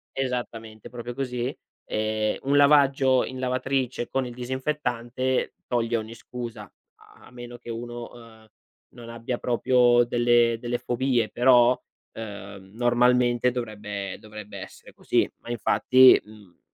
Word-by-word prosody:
Esattamente, 120 -4 -4
proprio 120 0 -7
così. 125 -2 -3 0.3
Ehm, 110 0 -1
un 140 +1 +1
lavaggio 140 -2 +4
in 130 0 -7
lavatrice 130 -1 -1
con 135 -1 -1
il 120 - -8
disinfettante 130 -1 -2
toglie 120 -1 0
ogni 110 0 -6
scusa, 120 0 -8 0.3
a - - -20
a - - -17
meno 120 0 -10
che 120 - -13
uno, 120 +1 -6
uhm, 115 -2 -16 0.4
non 120 -1 -12
abbia 115 +1 -4
proprio 120 0 +3
delle 120 -1 +3
delle 120 0 -2
fobie 120 -2 0
però, 125 0 +4 0.3
uhm, 100 -3 -9
normalmente 120 0 +3
dovrebbe 105 -5 -5
dovrebbe 105 -1 -10
essere - - -12
così. - - +1
Ma - - -13
infatti, 130 +3 +5
mhmm, 105 -4 -17
120 Hz, 130 wpm, -25 LUFS, 115-125 Hz, 0.4 s, infatti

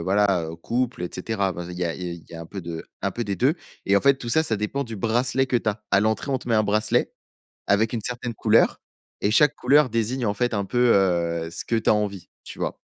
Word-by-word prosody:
voilà, 95 0 +2
heu, 80 - -8
couple, 120 +3 -2
et 90 - -3
cetera. 100 0 -1
Enfin, 85 0 -7
il 90 - -7
y 90 - 0
a 85 - -2
il 90 - -8
y 90 - -3
a - - -4
il 85 - -13
y - - -10
a 80 - -7
un 85 - -8
peu 95 - -7
de 85 -1 -6 0.2
un - - 0
peu 120 - -3
des 100 -1 -2
2. 135 - +3 0.3
Et 100 +1 +4
en - - +4
fait 140 -1 +4
tout 120 -3 -7
ça, 160 +7 +3
ça 110 -8 -1
dépend 105 +7 -2
du 115 -2 -7
bracelet 125 +5 +1
que 125 - +1
tu 110 - -1
as. 105 0 -3
À 95 - +5
l'entrée, 110 +6 0
on 130 - +1
te 120 - -10
met 115 - +2
un 110 - +4
bracelet, 105 +1 +1 0.5
avec 110 +3 +2
une 115 - -2
certaine 120 +1 -4
couleur. 110 +1 +3 0.4
Et 105 - +1
chaque 150 +6 +4
couleur 140 +1 +4
désigne 115 +2 -1
en 105 - 0
fait 120 +1 0
un 100 -1 0
peu, 120 +3 +3
heu, 85 -3 +1
ce - - -6
que 115 - 0
tu 110 - -1
as - - +6
envie, 100 -5 -2 0.2
tu - - -10
vois? - - -3
110 Hz, 285 wpm, -24 LUFS, 95-120 Hz, 0.5 s, as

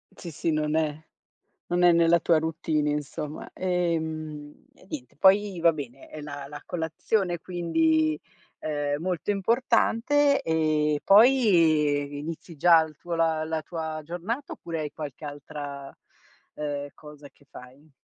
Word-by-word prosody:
Sì, 170 - -8
sì, 165 +2 -1
non 155 0 0
è 155 -1 -1 0.6
non 175 0 +2
è 175 - +7
nella 170 0 +4
tua 165 0 +3
routine, 160 -1 -1
insomma. 150 +1 -4
Ehm, 160 -4 -3
e - - -21
niente, 125 -5 -7
poi 195 +2 +4
va 170 0 +6
bene 135 -3 -8
è 155 - -9
la 145 -1 -7
la 150 +1 -9
colazione 175 +2 -1
quindi, 160 -3 +1 0.4
ehm, 145 -1 -2
molto 180 +1 -1
importante 240 +6 +2
e 155 -2 +1
poi 165 - +4
inizi 165 +2 -7
già 165 +2 +6
il 155 -1 -10
tuo 170 +3 -5
la 160 -1 +1
la 160 0 -2
tua 160 -1 -5
giornata 180 - -4
oppure 165 -1 -6
hai 150 -1 -4
qualche 150 0 -7
altra, 145 -1 -8 0.6
ehm, 145 -1 -3
cosa 150 -1 -13
che 145 - -27
fai? 135 +5 -14
160 Hz, 140 wpm, -26 LUFS, 150-175 Hz, 0.6 s, è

